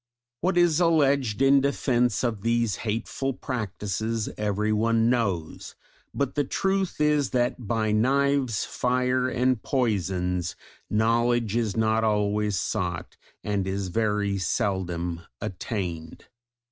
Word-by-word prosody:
What 180 +1 0
is 175 -2 +4
alleged 140 - +2
in 135 0 +6
defence 125 -4 +1
of 115 -5 -1
these 115 -1 +1
hateful 115 +4 -2
practices 110 -2 -3
everyone 110 +3 +1
knows, 100 -10 -2 0.4
but 140 -2 -2
the 145 - +1
truth 190 +5 -1
is 150 -2 +2
that 120 -2 -1
by 110 -1 0
knives, 135 +1 +2
fire, 125 +1 0
and 125 -2 +1
poisons, 90 -8 -1 0.3
knowledge 115 0 +2
is 115 -3 0
not 110 0 +2
always 105 -1 +1
sought, 90 -6 -3 0.3
and 100 -2 -1
is 95 0 -2
very 105 -1 0
seldom 90 -5 -1 0.2
attained. 90 -5 -5
115 Hz, 110 wpm, -26 LUFS, 100-130 Hz, 0.4 s, in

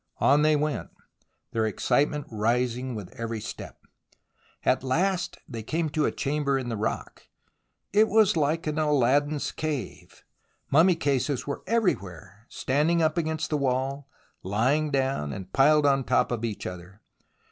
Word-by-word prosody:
On 145 +2 +4
they 155 0 +4
went, 150 0 -2 0.6
their 110 -1 0
excitement 145 - 0
rising 120 +3 0
with 105 -4 -8
every 115 -1 -3
step. - - -8 0.8
At 130 - +2
last 175 +7 0
they 115 -4 -6
came 155 +8 -2
to 150 0 0
a - - 0
chamber 140 -1 0
in 130 -2 -4
the 115 - -2
rock. 110 +1 -4 0.7
It 215 +2 +5
was 215 -3 +4
like 155 +1 0
an 155 0 -1
Aladdin's 145 0 +2
cave. 145 -10 -5 0.5
Mummy 170 +5 +5
cases 140 -3 -1
were 140 - -4
everywhere, 100 - -2
standing 150 +6 +1
up 155 -1 +2
against 160 -2 -2
the 150 - +2
wall, 135 +1 -1 0.3
lying 130 +11 +1
down 135 - -1
and 95 +4 -8
piled 150 +2 +5
on 135 -1 +3
top - - +1
of 120 -2 -2
each 110 -3 -4
other. 90 +4 -9
140 Hz, 145 wpm, -26 LUFS, 115-155 Hz, 0.8 s, It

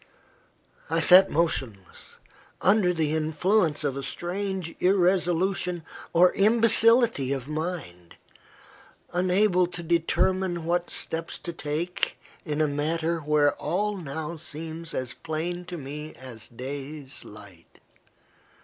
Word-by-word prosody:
I 165 +1 +1
sat 185 +3 +8
motionless, 130 - -2 0.4
under 195 -2 +3
the 160 -3 0
influence 160 +1 +1
of 140 -2 -1
a 140 - -4
strange 185 +2 -3
irresolution 180 -1 +1 0.3
or 180 +2 +5
imbecility 225 - +4
of 135 -2 -3
mind, 150 - -5 1.0
unable 180 0 +3
to 175 -1 -7
determine 175 +1 0
what 175 +1 0
steps 165 0 -2
to 170 - -6
take 160 +4 -2 0.3
in 150 -1 -1
a 155 - +3
matter 160 +3 -1
where 150 -1 +2
all 205 +7 -1
now 160 -1 -5
seems 165 +1 -7
as 130 -1 -3
plain 175 +3 -4
to 175 0 -6
me 150 +2 -7
as 125 -4 -9
days 140 +3 -6
light. 105 -5 -15
165 Hz, 115 wpm, -26 LUFS, 145-180 Hz, 1.0 s, sat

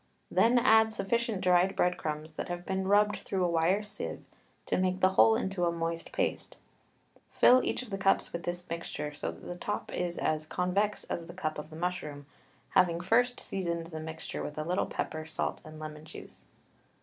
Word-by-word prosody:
Then 235 +2 +4
add 220 -2 +5
sufficient 225 -1 -1
dried 180 0 +4
bread 180 0 +2
crumbs 155 +1 -4
that - - -5
have 175 0 -4
been 190 0 -1
rubbed 210 +1 +4
through 185 -2 -1
a - - +3
wire 170 +5 +2
sieve 210 - -5 0.4
to - - 0
make 185 0 +1
the 185 - +5
whole 220 +4 +6
into 190 -6 -1
a 170 - +2
moist 165 0 -3
paste, - - -2 0.7
fill 255 +1 +6
each - - -1
of 235 - -12
the 195 - -3
cups 195 0 +2
with 170 - -3
this 175 +1 -3
mixture 165 -3 -4
so 145 - -3
that - - -10
the 175 - -5
top 205 +4 -4
is 175 -1 -2
as 155 0 0
convex 195 +5 0
as 165 -1 -4
the - - -10
cup 155 -5 -3
of 150 - -8
the 155 - -11
mushroom, 160 -4 -3 0.4
having 170 -2 +3
first 245 +7 +2
seasoned 170 -3 -2
the 160 - -5
mixture 160 +1 -6
with 150 - -6
a 155 - -1
little 180 +4 0
pepper, 155 0 -3
salt, 160 - -3
and 155 0 -11
lemon 155 0 -7
juice. 155 - -12
180 Hz, 195 wpm, -30 LUFS, 160-195 Hz, 0.7 s, whole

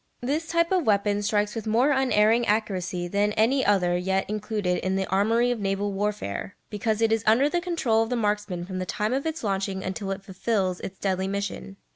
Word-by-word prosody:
This 295 +6 -1
type 335 +1 +1
of 365 -8 +1
weapon 205 0 +2
strikes 205 0 0
with 225 -1 -5
more 240 +7 +3
unerring 240 -4 +3
accuracy 190 -4 -1
than 205 +3 +1
any 255 +6 +2
other 180 -4 +2
yet 190 +2 0
included 210 -3 -1
in 185 0 -1
the 195 0 0
armoury 225 +5 +2
of 240 - -2
naval 200 0 -1
warfare, 200 - -3 0.2
because 220 +1 -1
it 225 - +3
is 225 -1 +1
under 235 +6 +5
the 345 +3 0
control 325 -11 +1
of 225 - -1
the 250 - 0
marksman 210 -5 -1
from 185 0 -5
the 185 - -4
time 210 +5 -1
of 275 +4 -1
its 320 -4 -4
launching 195 -1 -1
until 195 +1 -4
it 195 0 -4
fulfils 190 -1 -1
its 190 - -7
deadly 190 -1 -1
mission. 200 0 -4
210 Hz, 205 wpm, -26 LUFS, 195-230 Hz, 0.2 s, under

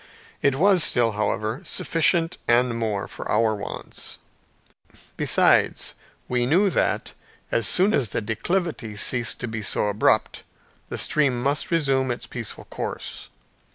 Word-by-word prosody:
It 140 -2 +2
was 185 +2 +5
still, 120 -2 +3
however, 110 +3 -2
sufficient, 165 0 +1
and 120 0 +3
more, 110 -4 -2
for - - -8
our 110 -1 +2
wants. 100 -1 -7 1.0
Besides - - +2 0.3
we 125 -1 0
knew 185 +7 +3
that, - - 0 0.4
as 115 -3 +1
soon 195 +4 +3
as 130 - +2
the - - -2
declivity 115 - -2
ceased 120 +3 0
to 120 - -3
be 110 -1 -4
so 105 +1 +1
abrupt, 105 +1 +1 0.5
the - - -4
stream 140 -5 +2
must 140 +2 0
resume 135 -6 +1
its 120 - -4
peaceful 115 -5 -7
course. - - -6
125 Hz, 135 wpm, -24 LUFS, 110-155 Hz, 1.0 s, was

